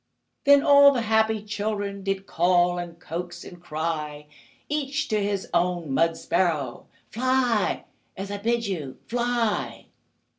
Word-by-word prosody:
Then 285 0 +7
all 280 0 +8
the 245 -4 -1
happy 220 -1 +2
children 205 -1 -3
Did 195 0 -2
call, 175 0 +2
and 170 -1 -7
coax, 175 0 -6
and 175 -1 -12
cry 155 -2 -4 0.4
Each 295 0 -2
to 215 -2 +1
his 200 -1 -2
own 175 -4 0
mud 165 +3 +2
sparrow: 155 -9 -1 0.2
"Fly, 250 -3 +1 0.3
as 195 +1 -5
I 205 - -4
bid 235 +2 0
you! 155 -10 -4
Fly!" 240 -2 -1
200 Hz, 135 wpm, -25 LUFS, 175-230 Hz, 0.4 s, all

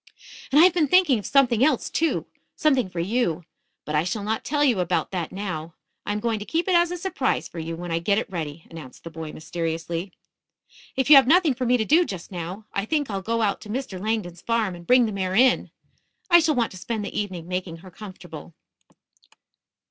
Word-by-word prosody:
"And 285 - +5
I - - +9
have 365 -1 +6
been 330 -4 +2
thinking 320 -7 +4
of 205 - -7
something 255 -4 +3
else, 280 -4 +2
too 330 0 0 0.3
something 270 -9 +2
for 175 - -6
you. 180 -3 0 0.4
But 150 - -5
I 150 +1 +2
shall 200 +4 -3
not 220 +2 -2
tell 295 0 0
you 245 -9 +3
about 180 - -1
that 175 -4 -3
now. 175 -5 -5 0.3
I - - 0
am 210 - -1
going 225 0 -1
to - - -5
keep 330 - -2
it 375 - +2
as 345 0 +4
a 355 - -4
surprise 345 -7 -1
for 170 - -9
you 165 +1 -4
when 175 +1 -6
I 165 - 0
get 200 +4 +1
it 225 - -1
ready," 160 -5 -6
announced 155 -6 -11
the 165 - -8
boy 160 -1 -7
mysteriously. 165 +2 -4 0.8
"If 265 +2 +1
you 290 - +12
have 270 - +6
nothing 330 -1 +4
for 250 0 -3
me 250 +1 +4
to 220 - -1
do 325 +8 +5
just 190 - -7
now, 180 +4 -6
I 195 - -1
think 290 -1 -1
I'll 195 -1 -3
go 230 +3 -1
out 200 -2 0
to 210 - -11
Mr. 215 -6 -4
Langdon's 200 -5 -3
farm 230 -5 0
and 170 -1 -12
bring 250 -1 +5
the 220 - -2
mare 190 -2 -2
in. 250 +3 +4 0.6
I 345 - +9
shall 315 -2 +2
want 235 -2 0
to 185 - -10
spend 210 +3 -4
the - - -7
evening 185 -5 -5
making 180 -2 -4
her 185 - -12
comfortable." 175 -5 -11
205 Hz, 225 wpm, -24 LUFS, 175-260 Hz, 0.8 s, you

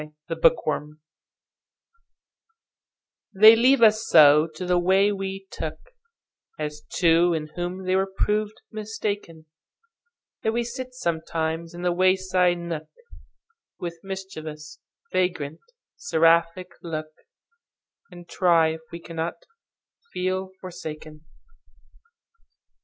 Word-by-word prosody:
In 150 0 -10 0.2
Neglect 155 -2 +1 2.4
THEY 215 +3 +9
leave 250 +2 +4
us 215 0 +5
so 150 +1 +7
to 180 - -5
the 180 0 +2
way 190 +3 +3
we 195 -1 -5
took, - - -5 0.8
As 150 -1 -5
two 170 -1 +3
in 155 -1 -4
whom 180 +2 -4
they 185 0 +1
were 190 0 +1
proved 210 +2 -1
mistaken, 205 -6 -5 1.0
That 220 - 0
we 240 +1 0
sit 255 +2 -7
sometimes 165 -4 -3
in 175 - -7
the 180 - +2
wayside 185 0 +2
nook, 170 -2 -5 0.9
With 170 -1 -6
mischievous, 160 -6 -8 0.3
vagrant, 180 -6 -1 0.4
seraphic 170 - +2
look, 155 -2 -5 1.0
And 175 -2 -13
try 170 -3 +3
if 160 0 -5
we 170 - -7
cannot 165 0 -4 0.8
feel 185 +1 -2
forsaken. 155 -3 -9
175 Hz, 100 wpm, -24 LUFS, 160-195 Hz, 2.4 s, THEY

